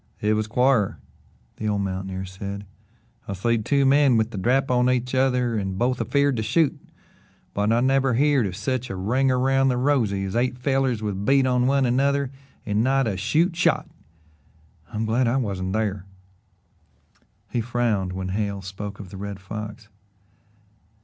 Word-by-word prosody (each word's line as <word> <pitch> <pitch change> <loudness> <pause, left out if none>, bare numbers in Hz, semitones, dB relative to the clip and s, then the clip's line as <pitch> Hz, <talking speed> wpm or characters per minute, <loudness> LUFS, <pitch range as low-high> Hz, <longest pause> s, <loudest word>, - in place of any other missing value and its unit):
"It 105 +1 +1
was 110 0 0
quar," 125 -2 +2 0.6
the 110 - -3
old 105 -1 0
mountaineer 95 0 -4
said. 100 +2 -7 0.6
"I've 100 - -4
seed 115 +3 0
two 140 -1 +2
men 135 -2 +5
with 110 +1 0
the 105 - -6
drap 130 +6 +1
on 125 0 +3
each 125 0 0
other 125 -2 +2
and 95 -3 -2
both 125 +2 0
afeerd 140 -3 +1
to - - 0
shoot, 135 +8 +2 0.8
but 105 +2 +1
I 115 +1 +3
never 135 -1 +2
heerd 140 -3 +3
of 90 - -6
sech 125 +4 -2
a 95 - -4
ring 125 +9 +1
around 135 +1 +2
the 125 -2 +1
rosy 125 -8 +1
as 95 - -4
eight 125 +1 0
fellers 130 -3 0
with 100 -2 -3
bead 135 +4 +4
on 125 -1 +2
one 135 0 +3
another 140 +2 +1 0.3
and 105 +1 +1
not 135 +1 +2
a 105 -4 -1
shoot 155 - +1
shot. 180 - +1 1.0
I'm 110 0 -2
glad 115 +3 +1
I 120 +3 +2
wasn't 95 -6 -2
thar." 100 -3 -2 1.4
He 120 - 0
frowned 115 -5 0
when 95 0 -4
Hale 100 0 -2
spoke 100 +2 -7
of 95 -3 -9
the 95 - -8
Red 100 0 -6
Fox. 105 +3 -7
115 Hz, 170 wpm, -24 LUFS, 100-130 Hz, 1.4 s, men